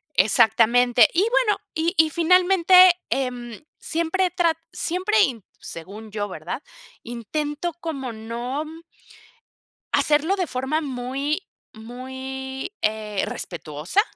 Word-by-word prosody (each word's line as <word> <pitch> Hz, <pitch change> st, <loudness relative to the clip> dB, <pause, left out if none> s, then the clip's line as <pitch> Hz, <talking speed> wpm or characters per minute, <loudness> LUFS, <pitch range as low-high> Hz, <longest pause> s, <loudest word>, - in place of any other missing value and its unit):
Exactamente, 235 Hz, +3 st, +5 dB
y 340 Hz, -, +3 dB
bueno, 470 Hz, -3 st, +2 dB, 0.2 s
y 335 Hz, +2 st, 0 dB
y 320 Hz, -1 st, +5 dB
finalmente, 360 Hz, +2 st, +3 dB, 0.4 s
em, 245 Hz, -4 st, -3 dB, 0.2 s
siempre 335 Hz, +3 st, 0 dB
he -, -, -2 dB
trat 340 Hz, -2 st, +1 dB, 0.2 s
siempre 375 Hz, +5 st, +1 dB
in 240 Hz, -, 0 dB, 0.2 s
según 200 Hz, +6 st, -9 dB
yo, 205 Hz, 0 st, -3 dB
¿verdad? 175 Hz, -, -6 dB, 0.4 s
Intento, 295 Hz, +8 st, -4 dB
como 275 Hz, -7 st, -4 dB
no. 235 Hz, +6 st, -4 dB, 1.3 s
Hacerlo 305 Hz, +6 st, +2 dB
de 370 Hz, -2 st, -1 dB
forma 265 Hz, +3 st, -1 dB
muy 275 Hz, +4 st, -3 dB, 0.3 s
muy, 265 Hz, -, -7 dB
eh, 215 Hz, -2 st, -1 dB
respetuosa, 160 Hz, -, -2 dB
265 Hz, 105 wpm, -23 LUFS, 230-330 Hz, 1.3 s, Exactamente